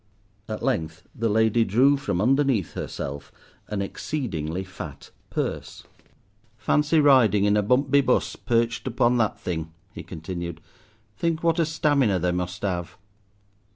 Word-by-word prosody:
At - - -4
length 80 0 -1
the 115 0 -1
lady 110 +2 +3
drew 125 +8 +4
from 135 -10 -2
underneath 130 - +2
herself 70 +1 -6 0.4
an 100 -2 -2
exceedingly 95 - -3
fat 90 -6 -9 0.2
purse. - - -4 0.7
"Fancy 150 +2 +2
riding 130 -8 +5
in 105 0 +3
a 105 - +3
bumpby 135 +6 +3
bus, 125 - +1
perched 115 0 0
up 120 - -6
on 120 +1 +4
that 110 -3 0
thing," 80 -2 -4 0.2
he - - -7
continued. 85 0 -6 0.6
"Think 165 +7 -1
what 165 0 +2
a 165 - +2
stamina 145 - +2
they 90 0 0
must 90 +1 -4
have." 90 -4 -3
110 Hz, 140 wpm, -25 LUFS, 90-135 Hz, 0.7 s, riding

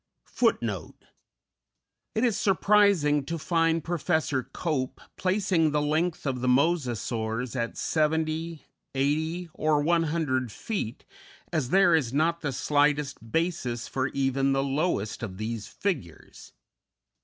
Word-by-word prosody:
_It - - 0 1.1
is 225 -1 +2
surprising 195 -7 +3
to 165 +2 -3
find 165 0 +1
Professor 160 -4 0
Cope 140 -7 -2 0.2
placing 185 -4 +2
the 150 0 +1
length 160 +3 0
of 130 -3 -1
the 125 - -1
Mosasaurs 125 - 0
at 115 -2 -2
70, 160 +1 -1 0.3
80, 160 +6 0
or 155 -1 +2
100 155 -7 +1
feet, 165 - -4 0.5
as 145 -7 0
there 190 0 +5
is 140 -8 +2
not 165 +3 +1
the 145 - -1
slightest 145 -3 0
basis 160 -8 -1
for 130 0 -1
even 135 0 +1
the 135 0 +1
lowest 140 - -1
of 95 -6 -5
these 110 0 -4
figures. 165 - -5
150 Hz, 115 wpm, -27 LUFS, 130-170 Hz, 1.1 s, there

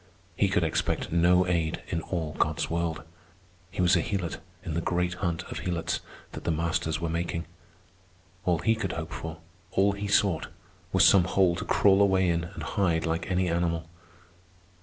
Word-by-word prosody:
He 100 +2 +2
could 100 -2 +2
expect 80 - -1
no 90 +2 +4
aid 85 -3 -1
in 85 -3 -1
all 80 -3 -3
God's - - 0
world. 85 -2 -1 0.7
He 95 - -1
was 90 +1 +5
a 85 - +3
helot 90 -4 -3 0.2
in 80 - -4
the 85 - 0
great 90 +1 0
hunt 85 -3 -1
of - - -4
helots 85 -2 -2 0.3
that - - -8
the - - -1
masters 80 -1 0
were 85 - -2
making. 85 +1 -2 1.0
All 90 -2 +2
he 115 +6 +2
could 105 -5 -3
hope 80 0 -5
for, 80 -1 -6 0.3
all 95 +2 +3
he 100 0 -4
sought, 95 -5 +2 0.4
was - - +5
some 95 -3 +6
hole 90 -1 +3
to - - -5
crawl 100 -1 +4
away 95 -2 +4
in 85 -1 +1
and 85 -1 -8
hide 85 -1 0
like 85 +1 -2
any 90 0 +1
animal. 85 -1 0
85 Hz, 180 wpm, -28 LUFS, 80-95 Hz, 1.0 s, some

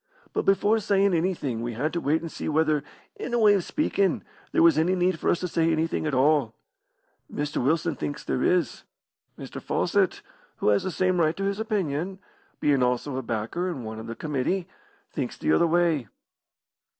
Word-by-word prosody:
"But - - -1
before 205 +3 +3
sayin' 200 -1 +2
anything 160 -9 -1
we 120 0 -3
had 145 +8 -2
to 170 - -1
wait 150 +3 +1
and 165 -1 -6
see - - -4
whether, 155 -2 +2 0.3
in 240 - -3
a - - +2
way 210 -2 +6
of 195 -3 +1
speakin', 200 - 0 0.3
there - - +3
was 165 -3 +6
any 165 +4 +2
need 180 -2 +1
for - - 0
us - - +2
to 180 - -1
say 165 -1 +1
anything 160 0 0
at 150 - -2
all. 135 -4 +3 0.8
Mr. 145 -3 -2
Wilson 160 +4 +1
thinks 145 - -5
there - - -1
is. 175 -7 +1 0.6
Mr. - - -8
Fawcett, - - 0 0.3
who - - +1
has 100 -1 +3
the - - -3
same 185 0 +1
right 160 -1 +2
to 195 - -3
his 200 +1 -1
opinion, 190 -4 -2 0.4
bein' 140 -3 +2
also 125 +2 0
a 130 - -2
backer 115 +10 -2
and 135 -10 -5
one 110 0 -6
o' - - -7
the 115 0 -6
committee, 155 +7 -2 0.4
thinks - - -4
the 310 - 0
other 170 - +4
way." 165 -6 +2
160 Hz, 195 wpm, -26 LUFS, 140-185 Hz, 0.8 s, way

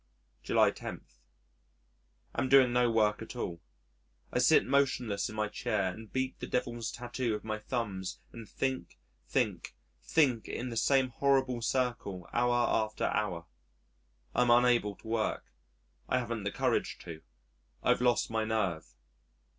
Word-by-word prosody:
July - - +3
10. - - -7 1.3
Am 130 - -1
doing 130 -2 +6
no 125 -1 +3
work 105 -2 +2
at 110 - -8
all.... 85 -8 -4 0.7
I - - +2
sit - - +5
motionless 125 -6 +1
in 110 - -8
my 110 0 0
chair 95 -3 -1
and 110 +2 -11
beat 130 0 -2
the - - -5
devil's 120 -2 -2
tattoo 120 -1 -3
with 105 - -4
my 110 -1 -3
thumbs 105 -6 -3
and 115 -2 -10
think, 130 - -3 0.3
think, - - -1 0.3
think 130 -8 +2
in 125 +1 -4
the 115 - -5
same 130 +3 +3
horrible 130 -1 +1
circle 115 -7 -1
hour 120 0 +3
after 110 -1 0
hour. 90 -6 -1 0.9
I - - +2
am 125 - +3
unable 120 -4 +4
to - - -15
work. 110 -1 -2 0.6
I - - +2
haven't 115 -4 -3
the 100 - -1
courage - - 0
to. 80 -2 -9 0.6
I've - - +3
lost 120 -2 +2
my 110 0 0
nerve. 95 - -2
115 Hz, 145 wpm, -31 LUFS, 105-125 Hz, 1.3 s, doing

